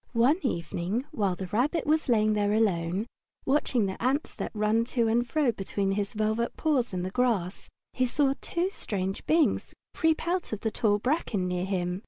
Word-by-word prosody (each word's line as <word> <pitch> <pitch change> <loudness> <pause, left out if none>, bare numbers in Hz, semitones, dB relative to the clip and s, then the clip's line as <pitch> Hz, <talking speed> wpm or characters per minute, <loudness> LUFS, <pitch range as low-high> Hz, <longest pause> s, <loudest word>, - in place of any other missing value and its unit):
One 280 +10 +3
evening, 185 +2 -2
while 200 - 0
the 190 - -5
Rabbit 255 - 0
was 310 -1 +1
lying 215 -2 +3
there 205 0 +1
alone, 190 -2 +1 0.4
watching 265 -5 +2
the 190 -1 -4
ants 265 +5 0
that - - -4
ran 215 +2 +2
to 230 -1 +4
and 235 +2 +1
fro 295 -4 +2
between 195 -1 -2
his 200 +2 -2
velvet 220 +2 -1
paws 280 -7 +1
in 180 -1 -3
the 185 - -3
grass, 210 -7 0 0.2
he 255 0 +1
saw 275 +2 +2
two 360 +2 -1
strange 195 - -3
beings 320 -1 +2 0.2
creep 320 -1 +1
out 355 -7 -1
of 215 - -4
the 220 - -1
tall 210 -2 +2
bracken 215 - -1
near 180 0 -1
him. 180 -1 -1
220 Hz, 185 wpm, -28 LUFS, 195-265 Hz, 0.4 s, to